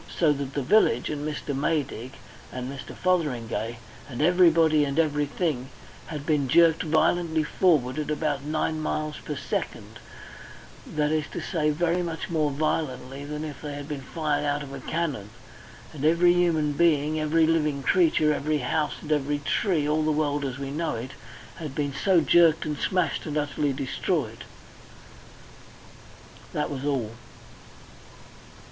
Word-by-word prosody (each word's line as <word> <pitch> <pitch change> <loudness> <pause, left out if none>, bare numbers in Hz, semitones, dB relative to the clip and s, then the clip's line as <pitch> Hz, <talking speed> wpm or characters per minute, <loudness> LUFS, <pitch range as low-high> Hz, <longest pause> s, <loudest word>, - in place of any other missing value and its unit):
So 155 -4 +2
that 140 -1 -5
the 140 - -1
village, 125 - +3
and 150 0 -3
Mr. 150 -2 -4
Maydig, 140 -4 -2 0.4
and 125 0 -5
Mr. 135 - -9
Fotheringay, 120 - -1 0.3
and 120 - -7
everybody 165 -2 +5
and 140 0 -2
everything 150 -3 0 0.4
had 150 -3 -6
been 150 -4 +1
jerked 165 +4 +5
violently 160 +1 +2
forward 150 -5 +2
at 150 - -3
about 150 -2 -1
nine 155 +1 -1
miles 155 0 -2
per 150 - -5
second - - -4 0.9
that 150 -1 0
is 155 -1 +1
to - - -3
say, 155 -4 0 0.3
much 170 -1 -4
more 155 -3 +1
violently 140 -2 -2
than 150 +1 -5
if 150 -3 -8
they 145 -2 -5
had 145 0 -7
been 145 -3 -5
fired 150 +1 -2
out 145 0 -1
of 140 -1 -9
a 140 - -6
cannon. 140 -8 -3 0.6
And 145 -2 -7
every 170 +3 +5
human 165 -4 +2
being, 155 -1 +2
every 155 +1 +3
living 150 -4 +1
creature, 155 -1 +3
every 150 +1 0
house, 150 +3 -1
and 155 - -6
every 145 -1 +1
tree 150 +1 0
all 155 +1 +1
the 155 0 +1
world 145 -1 0
as 135 -2 -3
we 140 0 -5
know 160 0 -2
it 120 +4 -6 0.5
had 150 -5 -6
been 145 -2 -1
so 180 +4 +3
jerked 165 0 +4
and 150 -1 -2
smashed 185 -2 0
and 150 0 -2
utterly 145 0 0
destroyed. 135 -1 -2 2.1
That - - -1
was 140 -1 -4
all. 130 -7 -1
150 Hz, 155 wpm, -26 LUFS, 140-160 Hz, 2.1 s, everybody